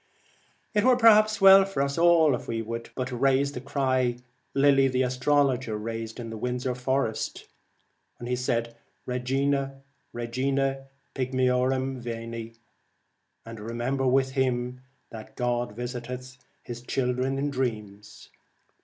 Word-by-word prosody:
It 210 -1 +2
were 255 0 +5
perhaps 215 -2 +5
well 195 0 +9
for 195 -8 -1
us 140 0 -2
all 165 -3 +5
if 125 - -4
we 115 -1 -2
would 115 +1 -6
but 130 0 -3
raise 135 +3 +2
the 125 - -7
cry 130 -3 0 0.4
Lilly 135 -1 +5
the 130 0 +1
astrologer 130 -2 +1
raised 115 +1 -5
in 115 -2 -7
Windsor 125 +1 -2
Forest, 125 -2 -2 0.7
' 120 -1 -4
Regina, 135 +2 -1 0.3
Regina 135 +3 -1 0.3
Pigme 130 -1 0
orum, 130 +1 0
Veni,' 115 -1 -6 0.9
and 115 -1 -9
remember 120 +5 -2
with 130 +1 +2
him, 125 -1 -1 0.3
that 110 -1 -10
God 120 -2 -1
visiteth 125 +1 -6 0.2
His 120 0 -7
children 130 +1 -1
in 145 +1 -1
dreams. 105 -6 -5
125 Hz, 120 wpm, -26 LUFS, 120-135 Hz, 0.9 s, well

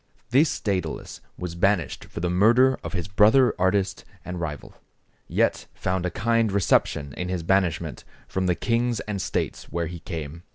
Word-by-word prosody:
This 145 +6 +3
Dædalus 90 -7 -3 0.2
was 90 -2 -5
banished 90 0 0
for - - -7
the 90 - 0
murder 120 +8 +4
of - - -6
his 90 -2 -2
brother 110 +7 +5
artist 95 +1 +1 0.2
and 90 -1 -5
rival, 75 -5 -5 0.5
yet - - +1
found 90 -1 -1
a - - -1
kind 115 +1 +1
reception 75 -7 +1
in 90 +5 -4
his 90 -2 -2
banishment 85 -3 0 0.2
from 95 -1 -1
the 90 - +2
kings 120 0 0
and 100 -3 -4
states - - -2
where 85 0 -3
he 85 +1 -6
came. 80 -2 -6
95 Hz, 165 wpm, -25 LUFS, 85-105 Hz, 0.5 s, brother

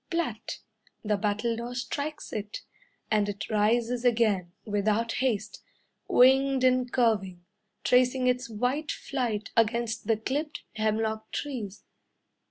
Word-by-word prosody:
Plat! 320 - -2 0.5
the 210 -1 +1
battledore 230 +4 -1
strikes 290 +5 -4
it, 210 -1 -5 0.5
And 210 -1 +2
it 205 +3 -5
rises 230 +3 +2
again, 220 -7 +2
Without 215 +2 +1
haste, 215 -5 -1 0.5
Winged 265 +1 +5
and 255 -1 +3
curving, 195 -7 +1 0.4
Tracing 250 +1 +3
its 250 0 +1
white 250 +7 -1
flight 235 -6 -3
Against 230 0 +1
the 225 -2 +3
clipped 290 +7 -3
hemlock 220 0 -1
trees. 230 -9 -5
230 Hz, 110 wpm, -28 LUFS, 210-255 Hz, 0.5 s, Winged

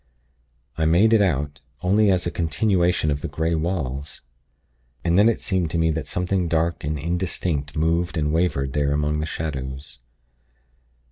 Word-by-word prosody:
I 80 - +2
made 95 +8 +4
it 110 - +5
out, 75 -6 0 0.2
only 100 +3 +4
as 90 -2 +2
a 85 - -1
continuation 85 -1 +1
of 70 0 -2
the - - -3
grey 80 +3 -1
walls.... 75 -4 -3 0.8
And 85 0 +2
then 105 +4 +6
it 115 - 0
seemed 90 -5 -1
to 85 - -2
me 80 0 +2
that 75 -2 -3
something 90 +1 -1
dark 85 +1 0
and 75 +1 -2
indistinct 85 -2 -2
moved 85 +2 0
and 75 -1 0
wavered 70 -6 0
there 70 -1 +1
among 75 +1 0
the 80 - -2
shadows. 65 -4 -5
80 Hz, 160 wpm, -23 LUFS, 75-90 Hz, 0.8 s, then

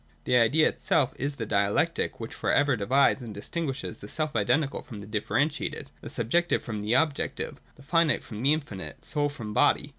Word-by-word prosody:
The 125 - +1
Idea 125 +7 +5
itself 135 -5 +1
is 140 +1 -2
the 115 - -4
dialectic 100 0 +1
which - - -6
for - - -1
ever 145 -2 +3
divides 130 +6 +3
and 115 -4 -7
distinguishes 135 +1 -4
the 100 - -10
self 155 -3 -2
identical 135 +7 +1
from 120 -8 -10
the 100 - -8
differentiated, 135 +8 -1
the - - -8
subjective 170 +10 +1
frr^m 110 -3 -4
the 105 +4 +1
objective, 155 -3 0
the 140 - -16
finite 165 +1 +2
from 110 -1 -7
the 135 +3 +4
infinite, 140 -11 -4
soul 145 -1 0
from 110 -7 -7
body. 145 +3 +3
135 Hz, 185 wpm, -27 LUFS, 110-150 Hz, -, Idea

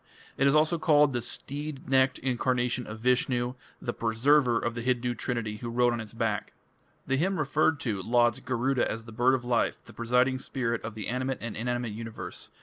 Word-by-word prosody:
It 140 - +3
is 140 - +4
also 155 +2 +3
called 150 -3 +4
"the 120 - -1
steed 145 +4 -6
necked 130 0 +3
incarnation 125 -1 0
of 110 +1 -8
Vishnu", 125 0 +1 0.3
the 120 - -3
"Preserver" 120 +2 +3
of 115 0 -1
the 115 - -4
Hindu 125 0 0
trinity 115 -3 -3
who 120 +2 -6
rode 120 +1 +2
on 120 - -2
its 110 - -8
back. 115 -3 -2 0.5
The 135 -1 +1
hymn 190 +6 +1
referred 150 +1 +2
to 105 -6 -1
lauds 120 +2 +2
Garuda 130 +1 0
as 115 +1 -4
"the 115 - -11
bird 125 +4 +3
of 120 -2 -5
life, 120 -1 0
the - - -13
presiding 125 +3 +2
spirit 120 -3 -2
of 110 0 -6
the 105 -3 -5
animate 130 +2 -1
and 115 -1 -5
inanimate 120 0 -2
universe 115 +1 -6
125 Hz, 195 wpm, -28 LUFS, 115-130 Hz, 0.5 s, is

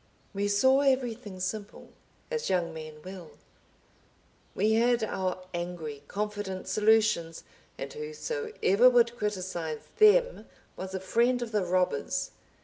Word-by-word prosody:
We 200 +1 -1
saw 260 +7 +4
everything 245 -7 0
simple, 205 +3 -5 0.4
as 470 -2 -2
young 175 -3 0
men 155 -1 -9
will. 185 -3 -10 1.2
We 215 +3 +2
had 235 +1 +3
our 185 -3 -2
angry, 170 -4 -5
confident 205 -2 -4
solutions, 210 -6 +2 0.3
and - - -6
whosoever 450 - +1
would 240 -1 +3
criticize 185 -8 -3 0.2
them - - +5 0.3
was 190 0 -6
a - - -2
friend 235 +6 +2
of 230 - -7
the 210 -3 +1
robbers. 180 -5 0
205 Hz, 120 wpm, -29 LUFS, 185-240 Hz, 1.2 s, them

